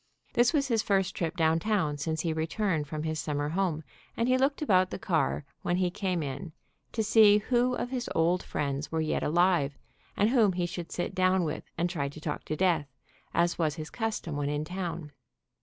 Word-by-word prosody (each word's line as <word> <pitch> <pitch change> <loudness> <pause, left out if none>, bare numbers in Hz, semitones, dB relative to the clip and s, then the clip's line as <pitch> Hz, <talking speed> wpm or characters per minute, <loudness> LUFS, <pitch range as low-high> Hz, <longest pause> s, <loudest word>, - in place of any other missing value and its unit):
This 240 0 +4
was 285 -3 +1
his 230 -4 +2
first 195 -3 +1
trip 170 +1 -2
downtown 165 0 +2
since 160 +2 -1
he 165 -1 -1
returned 160 0 -1
from 155 +1 -4
his 155 -1 -2
summer 145 0 -2
home, 165 -2 -1 0.3
and 230 - +1
he 255 - +4
looked 275 +3 +1
about 185 -8 +3
the - - -5
car 160 -5 0 0.2
when 175 - 0
he 180 -1 +1
came 185 -4 -1
in 140 +4 -5 0.4
to 220 - 0
see 210 -1 +6
who 245 +3 +1
of 245 - -3
his 250 -2 -3
old 170 +2 +2
friends 140 0 -3
were 160 - 0
yet 155 -1 0
alive, 165 -3 +2 0.4
and 210 +3 +3
whom 220 -7 +4
he 175 0 0
should 175 0 -6
sit 175 - -3
down 185 0 +3
with 155 - -3
and 170 +1 +1
try 150 -6 -2
to 145 - -10
talk 150 -1 -4
to 155 - -2
death, 165 -5 +2 0.5
as 170 +1 +2
was 155 -3 +1
his 155 -1 -7
custom 220 -9 -3
when 145 -1 -1
in 150 +1 -2
town. 175 -3 -5
175 Hz, 205 wpm, -29 LUFS, 155-205 Hz, 0.5 s, see